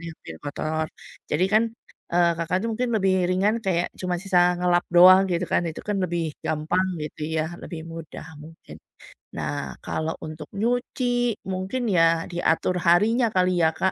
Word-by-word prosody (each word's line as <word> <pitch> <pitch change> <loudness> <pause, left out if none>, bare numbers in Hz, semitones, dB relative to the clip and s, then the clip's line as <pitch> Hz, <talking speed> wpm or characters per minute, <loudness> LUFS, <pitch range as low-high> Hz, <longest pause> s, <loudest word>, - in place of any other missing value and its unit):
yang 165 -1 -8
piring - - -9
kotor. 155 +2 -2 0.4
Jadi 160 +5 +2
kan, 215 +1 +5 0.5
eee, 175 -1 +4
Kakak 170 +2 -1
itu - - -1
mungkin 245 +2 -1
lebih 190 -2 +2 0.2
ringan 195 +4 +2
kayak 175 -2 +1
cuma 180 -1 -1
sisa 180 -2 +3
ngelap 175 -1 +2
doang 185 +2 +7
gitu 175 +1 0
kan, - - +2
itu 160 - -6
kan 210 -1 -1
lebih 165 -3 -2
gampang 160 +5 0 0.2
gitu 155 0 -7
ya, 155 - +1 0.2
lebih 165 -2 -7
mudah 165 -2 -8 0.2
mungkin. 160 +2 -13 0.6
Nah, - - -4
kalau 160 +1 -2
untuk 155 -1 -8
nyuci 245 +1 0
mungkin 205 +6 -2
ya 165 -1 +3
diatur 175 +1 +1
harinya 225 +7 +4
kali 180 -1 +2
ya, 160 - +5
Kak. 190 +3 +1
180 Hz, 165 wpm, -24 LUFS, 165-195 Hz, 0.6 s, doang